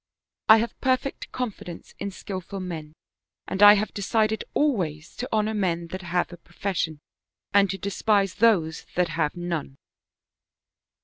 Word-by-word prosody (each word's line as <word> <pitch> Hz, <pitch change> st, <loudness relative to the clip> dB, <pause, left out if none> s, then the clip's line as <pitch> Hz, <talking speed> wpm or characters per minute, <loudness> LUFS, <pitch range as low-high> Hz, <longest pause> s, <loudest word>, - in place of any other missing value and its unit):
I 220 Hz, -, +10 dB
have 230 Hz, +1 st, -3 dB
perfect 260 Hz, +1 st, 0 dB
confidence 215 Hz, -8 st, -6 dB
in 200 Hz, -, -3 dB
skillful 195 Hz, 0 st, -6 dB
men 160 Hz, -5 st, -6 dB, 0.5 s
and 190 Hz, -, -3 dB
I 205 Hz, 0 st, +11 dB
have 210 Hz, +1 st, -1 dB
decided 215 Hz, +1 st, +1 dB
always 175 Hz, -, 0 dB
to 250 Hz, -, -4 dB
honor 215 Hz, 0 st, +1 dB
men 170 Hz, -5 st, -1 dB
that 185 Hz, +2 st, -5 dB
have 175 Hz, 0 st, -1 dB
a -, -, -9 dB
pro -, -, -24 dB
fession, 170 Hz, -5 st, -1 dB, 0.6 s
and 200 Hz, -1 st, +5 dB
to 195 Hz, -, -2 dB
despise 200 Hz, 0 st, +1 dB
those 190 Hz, -7 st, +2 dB
that 180 Hz, -1 st, +2 dB
have 155 Hz, -3 st, -1 dB
none." 170 Hz, -6 st, -3 dB
195 Hz, 145 wpm, -25 LUFS, 170-215 Hz, 0.6 s, I